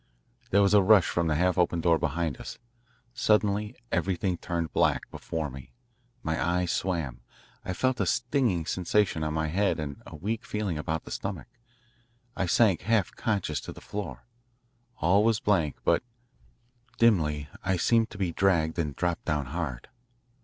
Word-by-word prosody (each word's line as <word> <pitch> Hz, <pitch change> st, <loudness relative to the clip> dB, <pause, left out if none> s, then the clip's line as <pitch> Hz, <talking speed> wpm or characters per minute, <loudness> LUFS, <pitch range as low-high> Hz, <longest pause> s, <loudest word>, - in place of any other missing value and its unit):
There 100 Hz, +1 st, +4 dB
was 100 Hz, 0 st, +3 dB
a 105 Hz, -, +7 dB
rush 100 Hz, -1 st, +6 dB
from 85 Hz, -1 st, 0 dB
the 75 Hz, -, +1 dB
half 90 Hz, +3 st, +2 dB
open 85 Hz, -1 st, +2 dB
door 85 Hz, -1 st, +3 dB
behind 80 Hz, -1 st, -1 dB
us. -, -, -7 dB, 0.6 s
Suddenly 105 Hz, -3 st, +1 dB, 0.2 s
everything 95 Hz, -1 st, 0 dB
turned 85 Hz, -1 st, -3 dB
black -, -, +3 dB
before 80 Hz, -2 st, -4 dB
me; 65 Hz, -1 st, -11 dB, 0.5 s
my 80 Hz, 0 st, -1 dB
eyes 90 Hz, 0 st, +1 dB
swam; 80 Hz, -10 st, -2 dB, 0.4 s
I 90 Hz, -, -3 dB
felt 130 Hz, +6 st, 0 dB
a -, -, +1 dB
stinging 120 Hz, -, +1 dB
sensation 90 Hz, -1 st, +1 dB
on 75 Hz, 0 st, -2 dB
my 80 Hz, 0 st, 0 dB
head 95 Hz, +2 st, +1 dB
and 70 Hz, -2 st, -5 dB
a -, -, -9 dB
weak 105 Hz, +9 st, -3 dB
feeling 100 Hz, -7 st, -3 dB
about 80 Hz, +1 st, -2 dB
the -, -, -11 dB
stomach; 100 Hz, -2 st, -4 dB, 0.9 s
I 95 Hz, -, -1 dB
sank 100 Hz, -1 st, +4 dB
half 110 Hz, -4 st, +1 dB
conscious 90 Hz, -, -1 dB
to -, -, -8 dB
the -, -, -11 dB
floor. 80 Hz, -12 st, -6 dB, 0.7 s
All 95 Hz, +5 st, +3 dB
was 110 Hz, -1 st, +3 dB
blank, 85 Hz, -9 st, +1 dB
but, -, -, +3 dB, 1.0 s
dimly, 75 Hz, -11 st, +3 dB, 0.2 s
I 95 Hz, 0 st, +1 dB
seemed 115 Hz, +5 st, +3 dB
to -, -, -10 dB
be 95 Hz, -3 st, -1 dB
dragged 85 Hz, -3 st, +1 dB
and 75 Hz, -4 st, -1 dB
dropped 85 Hz, -1 st, -1 dB
down 75 Hz, -2 st, 0 dB
hard. 75 Hz, -8 st, -4 dB
90 Hz, 165 wpm, -28 LUFS, 80-100 Hz, 1.0 s, a